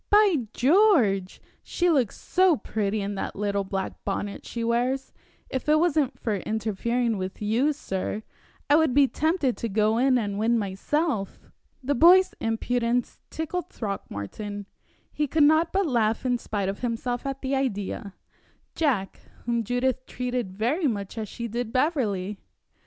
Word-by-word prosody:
By 395 - +4
George! 250 - +3 0.2
she 355 - -1
looks 260 -9 +1
so 365 -4 +3
pretty 210 -2 -2
in 200 +1 -3
that 195 - -4
little 200 0 -1
black 195 0 -4
bonnet 200 0 -4
she 235 - -4
wears, 245 +3 0 0.3
if 260 +2 -3
it 305 - +6
wasn't 310 -5 +1
for 215 -4 -1
interfering 220 +2 -1
with 185 0 -5
you, 230 +8 +2
sir, 210 -6 -4 0.4
I 290 - +5
would 315 -6 +2
be 285 -1 +6
tempted 310 -3 0
to 230 - -3
go 215 +2 +2
in 260 0 +4
and 205 -3 -2
win 230 +2 +2
myself." 210 - -2 0.3
The 280 +3 +1
boy's 360 +7 +6
impudence 235 +2 -1
tickled 345 +3 -4
Throckmorton. 205 - -5 0.5
He 300 - 0
could 310 +2 +3
not 315 +3 +4
but 390 0 +1
laugh 230 -5 +1
in 245 -1 +1
spite 205 -4 -3
of 195 +1 -3
himself 245 +2 -2
at 270 0 -5
the 270 +1 0
idea 205 -6 -3 0.6
Jack, 250 -12 0 0.3
whom 235 -1 0
Judith 250 +3 -1
treated 250 -5 -3
very 285 - +1
much 200 -5 -3
as 220 -3 -4
she 235 - -5
did 235 0 -3
Beverley! 210 - 0
240 Hz, 150 wpm, -26 LUFS, 205-285 Hz, 0.6 s, it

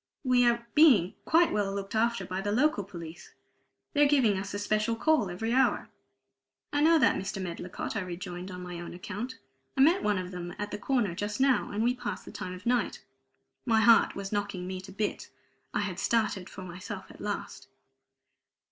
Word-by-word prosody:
"We 250 -2 +4
are 235 0 +1
being 260 - +6
quite 335 +1 +4
well 205 -2 0
looked 195 0 -5
after 225 -3 +1
by 185 +2 -3
the 205 +1 -2
local 255 -1 +2
police; 170 -3 -10 0.6
they're 290 -1 +5
giving 260 -8 +4
us 190 +1 -4
a 205 - -3
special 215 +2 0
call 290 -5 +2
every 225 +7 -2
hour." 265 +1 +2 0.8
"I 290 - +2
know 325 +2 +6
that, 300 - +4
Mr. 195 +1 -4
Medlicott," 180 +2 -5
I 215 - 0
rejoined 180 0 -6
on 180 -1 -7
my 175 -1 -6
own 175 0 -7
account. 210 +7 -6 0.4
"I - - +4
met 330 +7 +5
one 210 -2 +1
of 185 0 -4
them 175 -1 -6
at 205 0 -4
the 205 - -4
corner 235 -6 0
just 205 +5 -3
now, 270 -1 +3
and 210 +2 -1
we 245 +1 +3
passed 245 -6 -5
the - - -9
time 180 - -6
of 185 - -12
night." 245 0 0 0.6
My 225 -3 +3
heart 230 0 +5
was 195 -1 -5
knocking 205 -3 -2
me 185 0 -5
to 190 +1 -11
bits. 205 +2 -3 0.4
I - - 0
had 190 -3 -3
started 215 -5 0
for 190 - -9
myself 185 +2 -8
at - - -14
last. - - -5
205 Hz, 195 wpm, -29 LUFS, 185-240 Hz, 0.8 s, being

